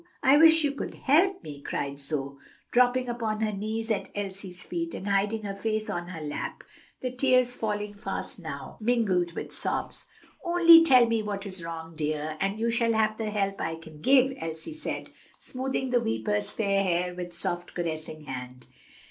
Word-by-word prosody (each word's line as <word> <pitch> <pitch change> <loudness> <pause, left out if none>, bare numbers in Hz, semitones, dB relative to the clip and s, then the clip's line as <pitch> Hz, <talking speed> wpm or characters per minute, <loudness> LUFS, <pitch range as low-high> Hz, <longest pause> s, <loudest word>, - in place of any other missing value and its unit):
I 265 +2 +6
wish 320 +1 +7
you 290 - +2
could 280 - -5
help 365 +7 +3
me!" 145 -1 -8
cried 140 0 -3
Zoe, 140 -1 -4 0.3
dropping 250 +1 +3
upon 225 -3 -2
her 215 -1 +1
knees 220 +3 -3
at 210 - -1
Elsie's 195 -2 -4
feet, 335 -1 -3
and 195 - -6
hiding 205 +2 +1
her 200 -1 -3
face 215 +2 -2
on 175 0 -3
her 170 -3 -7
lap, 150 -1 -5 0.4
the 255 - -2
tears 255 -1 +3
falling 210 -2 -2
fast 200 -1 -5
now, 150 -5 -7
mingled 200 -7 +1
with - - -6
sobs. - - -3 0.4
"Only 340 -2 +8
tell 255 -6 +7
me 230 -1 +1
what 205 -1 -4
is 185 -3 -5
wrong, 165 0 -7
dear, 155 0 -2
and 195 +2 -1
you 230 +1 +1
shall 230 0 +2
have 220 -1 +3
all 215 - -17
the 220 -2 -2
help 195 -2 -1
I 165 0 -2
can 160 -2 -13
give," 265 - +5
Elsie 160 - -5
said, 310 0 -5 0.3
smoothing 265 0 -3
the 245 -1 +3
weeper's 110 - -1
fair 200 -2 +1
hair 180 -1 0
with 175 -1 -6
soft, 175 +1 -2
caressing 155 -2 -4
hand. 125 -2 -7
205 Hz, 180 wpm, -27 LUFS, 165-245 Hz, 0.4 s, Only